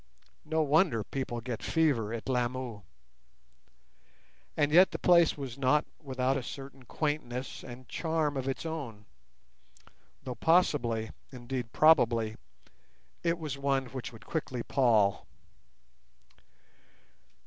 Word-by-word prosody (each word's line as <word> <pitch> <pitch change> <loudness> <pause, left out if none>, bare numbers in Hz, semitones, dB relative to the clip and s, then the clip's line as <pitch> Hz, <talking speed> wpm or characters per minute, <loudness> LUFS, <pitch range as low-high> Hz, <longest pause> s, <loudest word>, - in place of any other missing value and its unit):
No 160 +1 +1
wonder 150 - +3
people 120 -1 -4
get 120 -1 -5
fever 140 -10 +1
at 115 -1 -5
Lamu. 125 -3 -2 1.8
And 145 -1 +2
yet 180 +4 +7
the - - -4
place 170 -3 +4
was 135 -2 -6
not 140 +3 +3 0.2
without 130 -2 0
a - - -2
certain 135 +1 -9
quaintness 135 -4 -3
and 125 0 -10
charm 160 -1 -1
of 135 -1 -3
its 135 +4 -3
own, 135 -10 -5 1.2
though 130 - -4
possibly—indeed 125 -4 0
probably—it 120 - 0
was 150 -4 -5
one 135 -1 +1
which 130 -2 -5
would 115 -1 -14
quickly 130 -6 -3
pall. 110 -7 +2
130 Hz, 105 wpm, -30 LUFS, 120-150 Hz, 1.8 s, yet